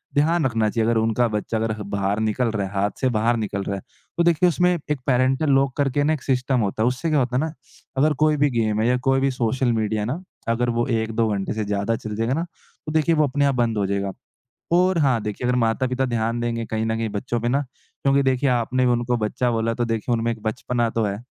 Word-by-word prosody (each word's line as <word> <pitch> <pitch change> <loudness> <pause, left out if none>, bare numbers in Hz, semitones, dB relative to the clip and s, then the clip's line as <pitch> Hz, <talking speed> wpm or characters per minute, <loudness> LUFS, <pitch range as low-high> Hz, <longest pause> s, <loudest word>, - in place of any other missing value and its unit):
ध्यान 155 +2 +2
रखना 115 -4 +1
चाहिए 110 +1 0
अगर 115 - +2
उनका 115 +2 +2
बच्चा 105 +1 -2
अगर 110 0 -1 0.2
बाहर 100 +1 -1
निकल 110 +3 0
रहा 100 -3 -2
है 95 - -11
हाथ 100 +1 +1
से 130 - +3
बाहर 115 +1 +1
निकल 100 -2 -3
रहा 100 - -3
है। - - -8 0.4
तो 170 - +3
देखिए 170 +1 +4
उसमें 180 +1 +2 0.2
एक 150 - 0
पैरेंटल 130 +3 +2
लॉक 135 -1 +2
करके 145 0 +1
ना 155 - +3
एक 150 - -4
सिस्टम 130 -1 +1
होता 105 +2 -1
है 120 - +3
उससे 130 +6 -1
क्या 150 - +3
होता 125 -1 -1
है - - +2
ना 160 0 -2 0.5
अगर 150 +3 +3
कोई 155 -1 +3
भी 145 0 +3
गेम 110 -3 0
है 115 - +2
या 125 0 +3
कोई 135 0 +4
भी 135 0 +2
सोशल 125 0 0
मीडिया 110 -1 0
है - - -1
ना 145 +9 -3 0.3
अगर 120 +1 +1
वो 120 0 0
1-2 115 -1 0
घंटे 100 0 -2
से 110 -1 -2
ज़्यादा 100 +2 0
चल 110 -1 -6
जाएगा 115 +4 0
ना 165 +4 0 0.4
तो 155 - -4
देखिए 160 +1 +3
वो 155 - +3
अपने 140 +2 +1
आप 140 -1 +2
बंद 120 -3 +1
हो 100 - +1
जाएगा। 100 0 -1 0.6
और 180 +1 +3
हाँ 130 -6 +2
देखिए 105 +4 -3
अगर 125 - +2
माता-पिता 125 +3 +1
ध्यान 115 -1 -1
देंगे, 115 -1 -2
कहीं 110 0 -2
न 110 - 0
कहीं 115 -1 -2
बच्चों 105 +3 -3
पे 120 - -1
ना 140 +3 +2 0.4
क्योंकि 140 0 +3
देखिए 130 +1 +2
आपने 125 +1 +1
उनको 120 0 +1
बच्चा 120 +3 -1
बोला 115 0 0
तो 120 +1 -1
देखिए 115 +1 -1
उनमें 115 0 0
एक 115 -2 -7
बचपना 120 +1 -1
तो 115 0 -1
है। 100 -1 -2
120 Hz, 250 wpm, -23 LUFS, 110-135 Hz, 0.6 s, देखिए